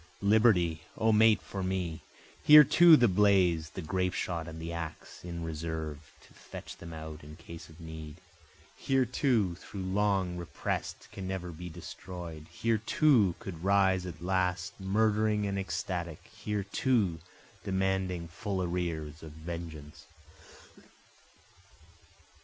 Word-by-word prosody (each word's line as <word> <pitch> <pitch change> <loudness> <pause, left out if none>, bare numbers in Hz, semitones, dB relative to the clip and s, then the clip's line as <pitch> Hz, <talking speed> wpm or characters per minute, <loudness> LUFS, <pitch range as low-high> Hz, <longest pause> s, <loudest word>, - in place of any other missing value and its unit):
O - - -7
Liberty! 100 -7 +4 0.2
O 110 0 +3
mate 110 0 +5
for 100 - -5
me! 90 -3 -2 0.4
Here 150 0 +10
too 170 +3 +7
the 120 - +5
blaze, 90 -5 +3
the 95 - -7
grape 90 +3 -1
shot 85 -2 -3
and 80 0 -8
the 85 +1 -5
axe, 80 -2 -7
in 85 -1 -5
reserve, 80 -1 -5
to - - -21
fetch - - -10
them 85 - -9
out 80 -1 -8
in 75 +1 -11
case 85 0 -11
of 80 +1 -16
need, 80 -2 -8 0.6
Here 135 -1 +1
too, 115 - +1
though - - -7
long 95 -1 0
represt, 85 - -4
can 95 -1 -6
never 95 -2 -4
be 90 +2 -8
destroy'd, 85 -1 -8
Here 110 +6 0
too 110 - +3
could 85 -3 -8
rise 95 -2 +3
at 85 -1 -8
last 95 +1 0
murdering 105 +1 +1
and 100 -1 -1
ecstatic, 90 -4 -4
Here 105 -1 -3
too 100 -4 +1 0.4
demanding 95 -2 -1
full 95 +3 -3
arrears 85 -3 -3
of 80 -2 -10
vengeance. 80 -2 -8
90 Hz, 135 wpm, -30 LUFS, 80-100 Hz, 0.6 s, Here